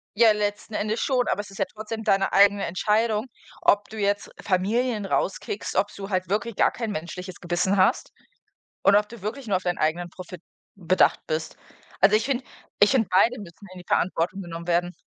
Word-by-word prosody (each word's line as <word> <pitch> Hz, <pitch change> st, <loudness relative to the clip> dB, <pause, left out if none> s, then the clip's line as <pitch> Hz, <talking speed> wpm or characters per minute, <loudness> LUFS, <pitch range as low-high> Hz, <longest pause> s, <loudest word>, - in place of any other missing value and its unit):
Ja, 225 Hz, 0 st, +6 dB
letzten 210 Hz, +1 st, -2 dB
Endes 215 Hz, +2 st, -1 dB
schon, 255 Hz, -3 st, +1 dB
aber -, -, 0 dB
es 205 Hz, -, -13 dB
ist 195 Hz, -, -12 dB
ja 195 Hz, -, +2 dB
trotzdem 220 Hz, +1 st, -6 dB
deine 195 Hz, -1 st, +2 dB
eigene 200 Hz, 0 st, +5 dB
Entscheidung, 215 Hz, +5 st, 0 dB, 0.3 s
ob 205 Hz, 0 st, +3 dB
du 220 Hz, -, -9 dB
jetzt 200 Hz, 0 st, -1 dB
Familien 215 Hz, +3 st, 0 dB
rauskickst, 195 Hz, +1 st, -2 dB
ob 205 Hz, +2 st, +1 dB
du 195 Hz, 0 st, -7 dB
halt 185 Hz, -2 st, -1 dB
wirklich 215 Hz, +3 st, -1 dB
gar -, -, +3 dB
kein 230 Hz, -3 st, -4 dB
menschliches 180 Hz, +1 st, -6 dB
Gewissen 180 Hz, +3 st, 0 dB
hast 185 Hz, -, +2 dB, 0.7 s
und 200 Hz, +1 st, +5 dB
ob 210 Hz, 0 st, +2 dB
du 235 Hz, 0 st, -11 dB
wirklich 230 Hz, +6 st, -5 dB
nur 195 Hz, -3 st, +1 dB
auf 185 Hz, -, -3 dB
deinen 180 Hz, 0 st, -1 dB
eigenen 170 Hz, +3 st, 0 dB
Profit 180 Hz, -1 st, -10 dB, 0.3 s
bedacht 185 Hz, -1 st, +2 dB
bist. 155 Hz, 0 st, -3 dB, 0.4 s
Also 200 Hz, +3 st, +6 dB
ich 215 Hz, -, 0 dB
finde 260 Hz, -1 st, -1 dB, 0.4 s
ich 205 Hz, -, +6 dB
finde 235 Hz, -6 st, +2 dB
beide 230 Hz, +7 st, +3 dB
müssen 195 Hz, +1 st, -12 dB
in 185 Hz, -, -10 dB
die 180 Hz, -, -13 dB
Verantwortung 180 Hz, +2 st, 0 dB
genommen 170 Hz, -2 st, -7 dB
werden. 175 Hz, +1 st, +1 dB
200 Hz, 195 wpm, -25 LUFS, 185-215 Hz, 0.7 s, Ja